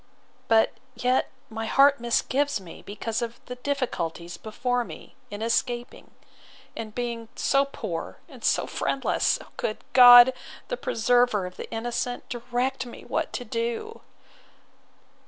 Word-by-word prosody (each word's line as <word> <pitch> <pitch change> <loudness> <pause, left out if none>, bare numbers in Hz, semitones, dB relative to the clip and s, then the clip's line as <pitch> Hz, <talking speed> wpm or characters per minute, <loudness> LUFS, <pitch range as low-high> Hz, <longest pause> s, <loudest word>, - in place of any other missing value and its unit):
But 225 -1 +4 0.2
yet 250 +2 +1 0.2
my 225 0 -5
heart 275 +3 +5
misgives 265 +3 +1
me, 180 -4 -12
because 215 +3 -4
of 235 0 -5
the 250 - -6
difficulties 175 - -3
before 245 +5 -2
me, - - -11 0.2
in 205 +1 -5
escaping; 240 +1 -2 0.7
and 215 -2 -7
being 235 -2 -4
so 275 0 +2
poor 210 -11 -6
and - - -14
so - - +2
friendless!—O 270 - 0
good 215 - -2 0.2
God! 245 0 +10 0.4
the - - -2
preserver 245 - +2
of 180 0 -8
the - - -8
innocent! 240 +2 -3
direct 250 +2 -2
me 240 - -11
what - - -2
to 245 - -4
do! 235 - -3
240 Hz, 130 wpm, -26 LUFS, 225-250 Hz, 0.7 s, God